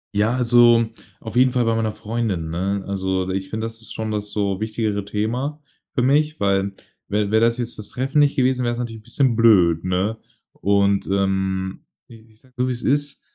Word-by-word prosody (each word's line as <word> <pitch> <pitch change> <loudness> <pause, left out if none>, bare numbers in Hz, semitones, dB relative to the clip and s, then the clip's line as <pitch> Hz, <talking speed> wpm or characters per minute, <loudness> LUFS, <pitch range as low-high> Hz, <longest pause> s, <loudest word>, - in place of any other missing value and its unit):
Ja, 110 +4 +2
also, 120 -1 +5 0.3
auf 110 0 -8
jeden 130 +1 +5
Fall 125 -2 +1
bei 115 0 +2
meiner 110 -1 0
Freundin, 110 -6 -3
ne? 95 +4 -2
Also, 95 -1 -1
ich 95 0 -3
finde, 110 0 -3
das 115 0 -7
ist 110 - -9
schon 110 0 -4
das 105 -1 -3
so 100 -2 -1
wichtigere 110 -2 -2
Thema 125 +9 -2 0.3
für - - 0
mich, 150 +4 +2
weil 100 0 +1 0.4
wäre 105 0 0
wäre 110 +2 +4
das 115 +1 0
jetzt 120 -1 -4
das 105 - -9
Treffen 135 +3 -2
nicht 145 -1 +4
gewesen, 130 -2 +2
wäre 120 - +1
es 120 - -5
natürlich 115 -2 -5
'n - - -28
bisschen 130 0 +1
blöd, 90 -8 +4
ne? 95 +4 -1 0.3
Und, 100 0 +1
ähm, 95 -1 -1 0.2
ich 110 -2 -17
sage 130 -1 -25
es - - -1
so - - +1
wie - - 0
es 120 -1 -4
ist. 145 +1 0
110 Hz, 205 wpm, -21 LUFS, 100-120 Hz, 0.4 s, also